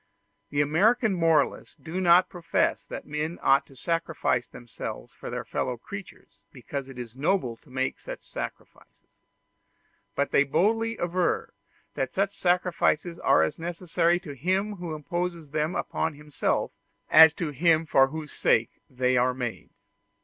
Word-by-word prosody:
The 145 - +1
American 210 - +3
moralists 165 -5 +1
do 170 +3 -5
not 180 0 +6
profess 175 -3 -1
that - - -7
men 155 +3 -3
ought 135 +1 +4
to 135 - -17
sacrifice 165 -5 -1
themselves 120 0 -8
for - - -8
their 125 0 -4
fellow 125 +1 -2
creatures 200 - -11
because 135 +2 -6
it 135 - -11
is 120 -1 -7
noble 140 -3 0
to - - -24
make 130 +1 -2
such - - -8
sacrifices; - - -9 1.0
but 140 0 0
they 140 - +5
boldly 225 +10 +1
aver 175 +1 -1 0.4
that 130 - -3
such 195 +1 0
sacrifices 175 -2 +1
are - - +4
as 80 - -2
necessary 170 0 0
to 165 -6 -8
him 190 - -1
who 170 -3 -5
imposes 170 0 -4
them 155 +3 -1
upon 160 -1 -2
himself 150 -1 -1 0.4
as 160 0 +10
to 165 -4 -3
him 165 +3 +3
for 135 -3 +5
whose 150 +1 -7
sake - - +1
they 125 0 +1
are 125 +1 +2
made. 120 -3 -5
160 Hz, 150 wpm, -27 LUFS, 135-175 Hz, 1.0 s, as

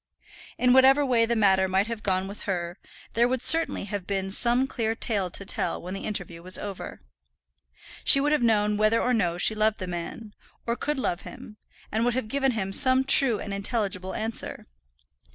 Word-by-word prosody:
In 250 0 +3
whatever 270 +2 +5
way 235 -3 +2
the 235 - 0
matter 190 -3 +3
might 190 +2 +1
have 230 -1 -6
gone 190 -1 -1
with 200 +1 -10
her, 175 -2 -4 0.3
there 235 +2 +3
would 255 0 -2
certainly 330 -7 +4
have 200 -2 -6
been 195 -1 -2
some 240 +5 +3
clear 225 -4 -3
tale 205 -5 -2
to 200 - -3
tell - - -2
when 180 +2 -8
the 195 - -6
interview 175 -5 -5
was 185 +2 -3
over. 200 -2 -8 1.0
She 275 - +5
would 290 +2 0
have 300 -3 +2
known 210 -3 +2
whether 215 +2 +2
or 250 - 0
no 175 -7 0
she 200 - +2
loved 215 0 0
the 185 - -5
man, 180 +5 -7 0.3
or 235 - -1
could 295 +3 -3
love 180 -9 -2
him, 210 - -12 0.3
and 220 +2 0
would 240 0 0
have 255 -4 -3
given 270 0 0
him 195 -3 -3
some 260 +4 +5
true 265 -4 +5
and 205 - -6
intelligible 200 -2 -3
answer. 220 +1 -4
215 Hz, 195 wpm, -25 LUFS, 195-245 Hz, 1.0 s, whatever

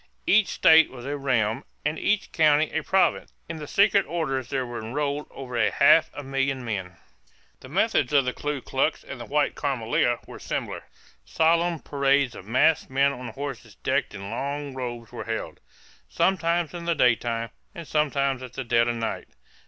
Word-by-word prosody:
Each 220 - +4
state 160 0 +5
was 125 -1 -10
a 145 +1 -2
realm 125 -4 0 0.2
and 150 +1 -1
each 210 -1 0
county 155 -1 +3
a 160 - 0
province. 190 +4 +1
In 165 - -6
the 150 -1 -7
secret 200 +2 +4
orders 135 -7 -2
there 130 -2 -1
were 120 -1 -6
enrolled 140 +6 -3
over 125 -4 -1
half 155 +3 +5
a 145 - -6
million 135 -1 -1
men. 95 -5 -4 0.6
The 130 - -12
methods 185 - +1
of 140 -3 +4
the 125 - -1
Ku 145 -2 -3
Klux - - -1
and - - -8
the - - -8
White - - +1
Camelia - - 0
were - - -11
similar. - - -4 0.4
Solemn 165 0 +1
parades 140 -2 +1
of 95 - -11
masked 130 +7 +3
men 135 +1 +3
on 125 -1 -7
horses 140 +5 -7
decked - - -1
in 100 +1 -7
long 140 +3 -4
robes 120 -3 -6
were - - -7
held, - - -4 0.5
sometimes 170 -3 +1
in 170 -1 -6
the 170 -1 +1
daytime 115 -3 +1 0.2
and 170 -2 -8
sometimes 140 -3 0
at 125 -1 -9
the 135 - -4
dead 115 -1 +2
of 120 - 0
night. 115 -1 -4
140 Hz, 175 wpm, -25 LUFS, 125-160 Hz, 0.6 s, state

